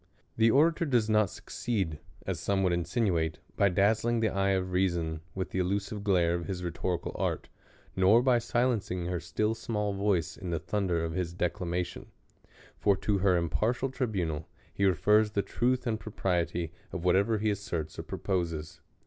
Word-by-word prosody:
The 115 0 +4
orator 160 +6 +4
does 120 -6 +2
not 105 -3 +4
succeed, 95 -11 -3 0.3
as - - -2
some 100 -1 0
would 90 -2 +2
insin 85 +7 0
uate, 80 -2 0 0.2
by 100 - +4
dazzling 110 +5 +2
the 110 -1 +2
eye 95 0 +1
of 95 -1 0
reason 85 -4 0
with 95 -1 -3
the 95 - -1
illusive 100 +3 -1
glare 90 -4 +3
of 85 -1 -3
his 90 -2 -4
rhetorical 85 0 -2
art, - - -1 0.5
nor. 100 +6 +5
by 125 -2 +4
silencing 115 -7 0
her 90 0 -1
still 110 +5 -1
small 105 -2 -2
voice 95 -5 0
in 95 - -6
the 85 - 0
thunder 85 0 -1
of 80 - -4
his 85 -1 -2
declamr..iion: 90 0 -2 0.7
for 100 -2 +3
to 100 0 0
her 95 -2 +3
impartial 110 - 0
tribunal 90 - -2 0.3
he 100 - +1
refers 105 +4 +3
the 100 - +1
truth 125 +2 0
and 110 -2 -1
propriety 85 -5 -1 0.2
of 90 -2 -5
whatever 100 +5 +3
he 105 0 +1
asserts 85 -6 -4
or - - -1
proposes. 85 -5 -3
95 Hz, 170 wpm, -30 LUFS, 85-110 Hz, 0.7 s, nor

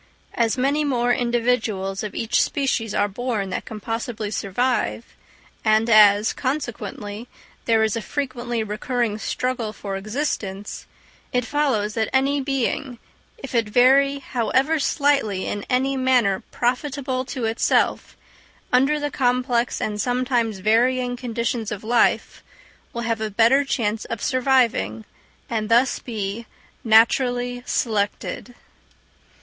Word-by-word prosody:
As 230 +1 +1
many 280 +4 +1
more 245 -4 +1
individuals 230 -6 0
of 210 - -6
each 235 +2 +1
species 235 -6 -1
are 205 - +2
born 210 -2 -3
than - - -2
can 220 -2 -8
possibly 225 -1 -4
survive; 235 +3 -1 0.6
and 220 +1 +3
as, 210 0 +6
consequently, 240 -5 -4 0.4
there 225 -1 +3
is 220 0 +1
a 230 - -2
frequently 240 -2 -3
recurring 215 +1 -2
struggle 245 -2 -2
for 200 -2 -6
existence, 205 -2 -4 0.4
it 250 -1 0
follows 250 -8 0
that 220 -1 -1
any 275 +2 +2
being, 265 -1 -2 0.4
if 275 - -9
it 230 -3 +1
vary 270 +4 +4
however 270 +4 0
slightly 280 -10 +1
in 205 - -4
any 265 +2 +1
manner 250 -7 +2
profitable 255 +1 -1
to 255 -2 -4
itself, 225 +1 0 0.6
under 275 +4 +3
the 290 0 -2
complex 245 -1 0
and 210 -1 -2
sometimes 245 -3 0
varying 245 +5 +2
conditions 235 -2 -3
of 210 0 -5
life, 235 +2 +1 0.5
will 235 - -4
have 230 -1 -1
a 220 - -1
better 235 +7 +4
chance 225 -5 -1
of 230 - -5
surviving, 245 - +1 0.4
and 220 -2 -2
thus 240 +3 +3
be 220 -1 -5 0.4
naturally 245 +2 +3
selected. 220 +2 -2
235 Hz, 125 wpm, -22 LUFS, 215-255 Hz, 0.6 s, as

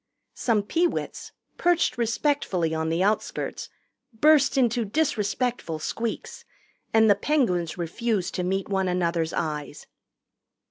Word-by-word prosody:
Some 220 -4 +1
Peewits, 340 - -1 0.3
perched 350 -1 +2
respectfully 230 - 0
on 160 0 -1
the 165 +3 +1
outskirts, 210 +2 -2 0.4
burst 285 +4 +4
into 240 -2 +2
disrespectful 225 - -1
squeaks, 225 +8 -4 0.5
and 220 0 +5
the 205 - +7
Penguins 200 - 0
refused 190 +3 -2
to 180 - -2
meet 190 +2 -1
one 190 -2 0
another's 170 -2 0
eyes. 150 -2 -4
205 Hz, 110 wpm, -25 LUFS, 175-245 Hz, 0.5 s, the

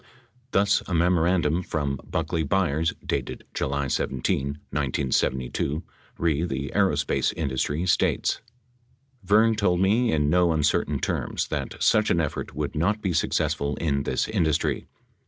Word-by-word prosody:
Thus, 100 -2 +3
a 90 - -1
memorandum 85 -1 +2
from 70 -5 -2
Buckley 80 - -2
Byers 80 -3 +1
dated - - -3
July 70 0 -1
17, 65 +1 -1 0.2
1972, 70 +1 -1 0.3
re 80 -2 +1
the 70 -5 -3
aerospace 90 -8 +1
industry, 75 +2 -1
states: 85 - +1 0.8
Vern 110 +4 +4
told 90 -4 +1
me 110 +6 +3
in 75 -2 +1
no 85 +1 +3
uncertain 75 -1 +1
terms - - -2
that - - -3
such 110 - +3
an 85 - +2
effort 75 -4 -3
would 75 -2 -3
not 95 +8 +1
be 95 -4 -1
successful 70 -2 0
in 70 -4 0
this - - -1
industry. 85 -8 0
80 Hz, 130 wpm, -25 LUFS, 70-90 Hz, 0.8 s, Vern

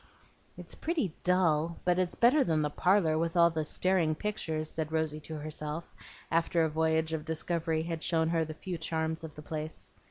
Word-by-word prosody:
"It's - - -6
pretty 310 - -1
dull, 170 -3 +2
but 180 0 +3
it's 180 -1 0
better 265 +5 +5
than 155 -3 +1
the 150 - -1
parlor 175 -2 +3
with 165 +1 -1
all 170 0 +6
the 160 -1 -1
staring 170 0 +2
pictures," 160 -6 -2
said 160 0 -3
Rosy 160 -1 0
to 155 +1 -7
herself, 155 +1 -4 0.4
after 165 0 +2
a 160 - +2
voyage 160 +1 +1
of 155 -1 -2
discovery 160 0 -1
had 165 -1 -4
shown 160 -1 +2
her 165 -1 +2
the 155 0 -6
few 175 0 -5
charms 160 0 -2
of 155 -2 -8
the 150 - -10
place. 155 0 -5
160 Hz, 190 wpm, -31 LUFS, 155-170 Hz, 0.4 s, all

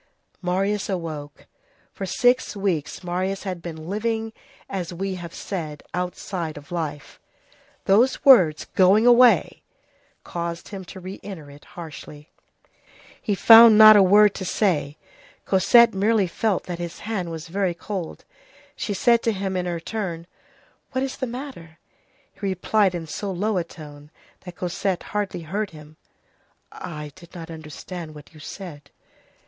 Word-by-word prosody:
Marius 195 +3 -1
awoke. 155 -6 -5 0.5
For 195 - -5
six 245 +4 +2
weeks 190 -5 -2
Marius 185 +2 -2
had 185 -3 -5
been 160 -2 -8
living, 220 +2 -2 0.3
as 185 -3 -4
we 190 +2 -3
have 175 -2 -7
said, 155 -7 -6
outside 180 -2 -4
of 145 +2 -13
life; 155 -4 -5 0.7
those 230 +7 +3
words, 180 - +6
going 195 +4 +5
away! 245 0 +5 0.6
caused 170 0 -5
him 195 -2 -7
to 190 - -10
re 185 +1 -8
enter 160 -8 -9
it 145 +1 -16
harshly. 150 -2 -10 0.9
He 205 - -1
found 225 +2 +9
not 215 0 +10
a 205 - +7
word 205 +2 +6
to - - -6
say. 155 -8 0 0.5
Cosette 225 +5 +5
merely 205 +1 +2
felt 195 +3 -1
that 175 -2 -6
his 170 -1 -6
hand 205 -6 -3
was 165 0 -7
very 185 0 -1
cold. 185 -2 -6 0.5
She 205 - -3
said 235 +3 +3
to 230 - +1
him 190 -2 -3
in 180 -1 -1
her 170 -1 -3
turn: 170 -3 -5 0.7
"What 260 - 0
is 270 - -4
the 260 - -3
matter?" 240 - -8 0.6
He - - -27
replied 195 0 +1
in 170 -2 -5
so 180 +6 -5
low 200 +3 -1
a - - -1
tone 150 -3 -13 0.4
that 180 -1 -9
Cosette 180 +1 -2
hardly 205 -4 -2
heard 200 +6 -3
him:— 155 -1 -14 0.7
"I 150 -3 -8
did 170 +1 -16
not 165 -1 -8
understand 160 +1 -8
what 150 +1 -14
you 155 - -15
said." 150 -3 -9
185 Hz, 150 wpm, -23 LUFS, 165-205 Hz, 0.9 s, not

